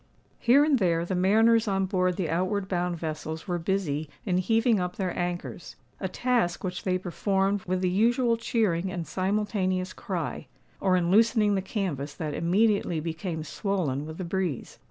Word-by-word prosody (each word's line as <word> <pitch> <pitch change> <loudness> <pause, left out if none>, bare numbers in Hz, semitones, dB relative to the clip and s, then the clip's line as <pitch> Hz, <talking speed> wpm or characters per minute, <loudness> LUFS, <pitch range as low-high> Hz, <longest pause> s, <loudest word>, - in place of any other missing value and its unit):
Here 260 +4 +5
and 290 -4 +3
there 170 -3 +1
the 185 - -3
mariners 220 +5 +4
on 195 -1 +1
board 185 -1 +1
the 180 -2 -1
outward 185 +5 -1
bound 180 -2 -1
vessels 160 +1 -5
were 175 -1 -1
busy 165 -5 -1 0.2
in 180 -4 +1
heaving 225 +3 +2
up 180 0 -3
their 185 -3 -2
anchors—a 175 +2 -5
task 235 -3 0
which 180 -1 -3
they 185 -1 +2
performed 195 +2 0
with 185 0 -1
the 185 - +2
usual 235 +4 +3
cheering 195 -6 0
and 175 -3 -4
simultaneous 185 -1 -1
cry,—or 185 +1 -3
in 175 -1 +1
loosening 220 0 +4
the 195 - +1
canvass 170 - -3
that 155 -2 -4
immediately 190 0 +2
became 160 +1 -4
swollen 155 - -2
with 160 0 -8
the 185 - -4
breeze. 175 -6 -3
185 Hz, 160 wpm, -27 LUFS, 170-205 Hz, 0.2 s, Here